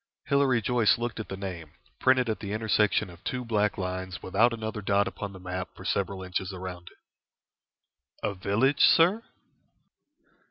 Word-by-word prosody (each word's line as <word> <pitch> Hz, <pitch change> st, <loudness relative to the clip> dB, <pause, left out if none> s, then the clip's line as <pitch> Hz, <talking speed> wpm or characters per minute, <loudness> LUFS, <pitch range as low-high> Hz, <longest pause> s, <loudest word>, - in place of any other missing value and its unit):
Hilary 135 Hz, -5 st, +2 dB
Joyce 120 Hz, -1 st, +3 dB
looked 120 Hz, -1 st, -4 dB
at 110 Hz, -, -5 dB
the 95 Hz, -, -5 dB
name, 85 Hz, -6 st, -7 dB, 0.3 s
printed 130 Hz, -1 st, +3 dB
at 110 Hz, -, -1 dB
the 100 Hz, -1 st, -5 dB
intersection 110 Hz, -2 st, +2 dB
of 85 Hz, 0 st, -16 dB
two 125 Hz, -1 st, -3 dB
black 105 Hz, -2 st, +1 dB
lines 95 Hz, 0 st, -4 dB
without 110 Hz, +6 st, +3 dB
another 110 Hz, -2 st, -4 dB
dot 100 Hz, 0 st, +2 dB
upon 100 Hz, -1 st, -5 dB
the 95 Hz, -, -11 dB
map 90 Hz, 0 st, -5 dB
for -, -, -11 dB
several 95 Hz, -1 st, -1 dB
inches 95 Hz, +1 st, -3 dB
around 90 Hz, -2 st, -7 dB
it. -, -, -14 dB, 1.3 s
"A 100 Hz, -, -2 dB
village, 110 Hz, +9 st, +1 dB
sir?" 180 Hz, +7 st, +6 dB
100 Hz, 160 wpm, -28 LUFS, 95-115 Hz, 1.3 s, sir